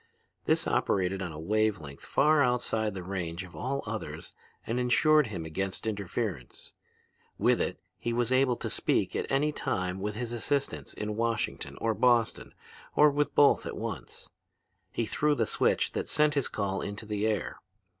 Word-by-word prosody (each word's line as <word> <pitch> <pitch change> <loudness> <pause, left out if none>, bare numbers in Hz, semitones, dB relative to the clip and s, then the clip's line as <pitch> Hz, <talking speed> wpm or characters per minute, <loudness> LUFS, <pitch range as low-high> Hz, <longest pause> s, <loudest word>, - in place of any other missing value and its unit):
This - - +2
operated 95 0 +1
on 90 -3 -3
a 75 - -8
wave 110 +4 +1
length 70 -3 -10
far 150 +1 +3
outside 115 -5 +1
the 95 - -5
range 90 -2 -4
of 90 - -12
all 140 +2 -2
others - - -5 0.3
and 120 +2 -1
insured 150 +4 +4
him 90 -7 -5
against 95 +6 -4
interference. 100 - -4 0.6
With - - +3
it - - -2 0.2
he 120 - -2
was 120 +1 0
able 130 -1 +4
to - - -4
speak - - 0
at - - -2
any 145 +3 +2
time 90 -9 -2
with 105 +1 -3
his 120 +1 -4
assistants 140 +4 -2
in 105 0 -3
Washington 115 -1 -2
or 115 -1 +1
Boston 120 +1 +2 0.4
or 150 0 +6
with 145 +1 0
both 145 -1 +5
at - - -5
once. 105 - -6 0.6
He 115 - -1
threw 150 +6 +1
the 115 - +1
switch - - +1
that - - -3
sent 150 -1 +3
his 140 -3 +1
call 100 -2 -2
into 100 +2 -5
the 105 0 -1
air. 105 -4 -1
110 Hz, 170 wpm, -29 LUFS, 95-125 Hz, 0.6 s, or